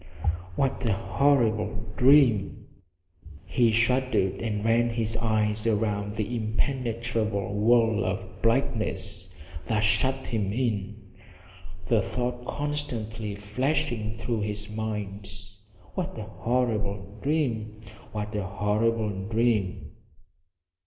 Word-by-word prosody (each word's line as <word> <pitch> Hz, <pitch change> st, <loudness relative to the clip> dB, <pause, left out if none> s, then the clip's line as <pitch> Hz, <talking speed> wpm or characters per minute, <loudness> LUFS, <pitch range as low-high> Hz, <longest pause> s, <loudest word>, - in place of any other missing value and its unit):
What 135 Hz, +2 st, 0 dB
a 110 Hz, -, +3 dB
horrible 110 Hz, -1 st, +1 dB
dream! 125 Hz, -7 st, +4 dB, 0.8 s
He 120 Hz, -4 st, +3 dB
shuddered 115 Hz, -3 st, +2 dB
and 105 Hz, -2 st, -2 dB
ran 115 Hz, +1 st, +3 dB
his 115 Hz, -1 st, 0 dB
eyes 110 Hz, -1 st, +1 dB
around 105 Hz, -2 st, 0 dB
the 110 Hz, +3 st, -2 dB
impenetrable 115 Hz, -3 st, -1 dB
wall 115 Hz, +1 st, +4 dB
of -, -, -4 dB
blackness 110 Hz, -6 st, 0 dB, 0.4 s
that 110 Hz, -2 st, +1 dB
shut 130 Hz, +5 st, +2 dB
him 105 Hz, -4 st, -1 dB
in, 110 Hz, -4 st, -1 dB, 0.9 s
the 110 Hz, +2 st, +3 dB
thought 125 Hz, +3 st, -3 dB
constantly 115 Hz, -8 st, -3 dB
flashing 120 Hz, +2 st, -1 dB
through 110 Hz, 0 st, -2 dB
his 105 Hz, 0 st, -4 dB
mind, 105 Hz, -2 st, -4 dB, 0.6 s
what 180 Hz, -9 st, -3 dB
a 110 Hz, -, -4 dB
horrible 105 Hz, -3 st, -1 dB
dream 115 Hz, -8 st, -1 dB, 0.3 s
what 105 Hz, 0 st, -4 dB
a 105 Hz, -, -1 dB
horrible 105 Hz, 0 st, 0 dB
dream! 110 Hz, -5 st, +1 dB
110 Hz, 100 wpm, -27 LUFS, 105-120 Hz, 0.9 s, dream